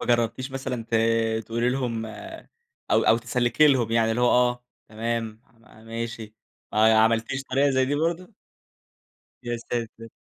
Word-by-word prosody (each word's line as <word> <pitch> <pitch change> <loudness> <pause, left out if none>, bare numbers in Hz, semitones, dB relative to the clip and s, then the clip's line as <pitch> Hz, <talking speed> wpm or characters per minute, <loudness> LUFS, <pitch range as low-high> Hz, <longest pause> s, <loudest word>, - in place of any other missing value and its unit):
وما - - -6
جرّبتيش 120 +3 -3
مثلًا 130 -3 -4
ت - - -1 0.5
تقولي 115 +1 0
لهم 120 -4 -2 0.8
أو - - +4
أو 115 - +4
تسلّكي 120 +5 +2
لهم 125 -6 +2
يعني 115 -1 +2
اللي 115 +2 -1
هو 125 - +4
آه، 125 0 +2 0.2
تمام، 115 0 -3
ما 115 -1 -20
ماشي. 115 -1 -6 0.4
آه، 110 +1 +4
ي 110 - +5
عملتيش 115 +5 +2
طريقة 135 +2 +1
زي 130 0 +2
دي 140 - -1
برضه؟ 170 +6 -2 1.1
يا 120 0 -2
ساتر! 115 -1 -5
120 Hz, 155 wpm, -25 LUFS, 115-130 Hz, 1.1 s, ي